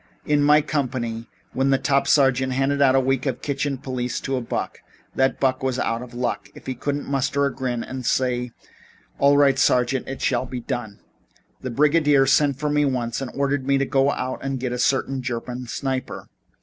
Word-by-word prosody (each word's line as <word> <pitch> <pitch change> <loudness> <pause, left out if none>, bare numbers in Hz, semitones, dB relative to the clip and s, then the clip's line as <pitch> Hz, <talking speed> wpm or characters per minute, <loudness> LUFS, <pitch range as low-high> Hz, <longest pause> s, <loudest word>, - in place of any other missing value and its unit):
In 150 -1 +2
my 150 +1 +5
company, 120 -6 -3 0.2
when 135 +1 +1
the 135 - +4
top 140 0 +1
sergeant 130 -2 +3
handed 135 +2 0
out 135 -1 +5
a - - +5
week 135 +1 0
of 130 - -3
kitchen 140 -1 -2
police 125 -2 -3
to 135 - -2
a 125 - -1
buck, 115 - -4 0.3
that 135 0 +1
buck 130 -1 +1
was 130 -1 -1
out 115 -2 -1
of 125 -1 -10
luck 120 0 -3
if - - -13
he 130 - -2
couldn't 145 +3 -3
muster 140 +1 0
a 140 - -1
grin 125 -3 -3
and 130 0 -6
say: 125 0 0 0.7
'All 140 +1 +5
right, 135 -2 +4
sergeant. 125 0 +2
It 135 - -5
shall 130 0 0
be 125 0 -5
done.' 120 -4 -5 0.6
"The 130 - -4
brigadier 145 +1 +3
sent 140 0 +3
for 150 0 -1
me 150 0 +2
once 125 -3 -1
and 135 - -4
ordered 140 -1 -1
me 140 0 +3
to 135 - +1
go 135 0 +2
out 130 -1 -3
and 135 -1 -2
get 125 -1 -3
a 125 - -4
certain 135 +1 +1
German 125 0 -5
sniper. 130 +1 -4
130 Hz, 200 wpm, -23 LUFS, 125-140 Hz, 0.7 s, my